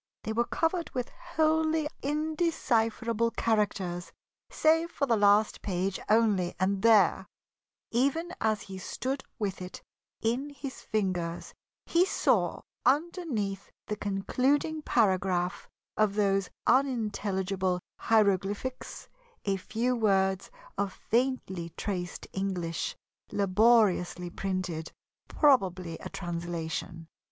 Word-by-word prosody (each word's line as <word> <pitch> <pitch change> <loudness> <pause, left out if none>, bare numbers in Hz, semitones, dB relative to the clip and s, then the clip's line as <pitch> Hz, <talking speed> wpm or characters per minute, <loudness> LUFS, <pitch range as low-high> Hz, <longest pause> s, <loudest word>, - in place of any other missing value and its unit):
They 220 - -2
were 235 +2 +2
covered 335 +4 0
with 250 -1 -2
wholly 315 0 +1
indecipherable 255 -7 0
characters 195 -5 0 0.4
save 325 +2 +3
for 290 - -1
the 240 -4 +3
last 205 0 +4
page 190 0 -1
only, 210 -5 +3
and 190 +1 +1
there, 205 -4 +5 0.6
even 280 +9 +1
as 215 -1 +1
he 190 -1 -8
stood 265 +8 -3
with 200 -5 -3
it 180 0 -8 0.4
in 245 +6 0
his 280 -2 -8
fingers, 180 -5 -2 0.3
he 340 +1 +4
saw, 385 - +1 0.2
underneath 270 - 0 0.2
the 210 - -3
concluding 260 +10 0
paragraph 185 -7 +1 0.3
of 215 -2 +2
those 195 -2 +2 0.2
unintelligible 200 -7 +1 0.2
hieroglyphics, 205 +3 0 0.4
a 195 -1 +2
few 230 +6 -1
words 195 -4 +2 0.3
of 200 -1 0 0.2
faintly 215 -9 0
traced 180 -3 -4
English, 180 -4 -2 0.4
laboriously 200 -3 +3
printed, 185 -4 -3 0.4
probably 185 - +2
a - - -7
translation. 170 -1 -4
210 Hz, 100 wpm, -29 LUFS, 185-255 Hz, 0.6 s, there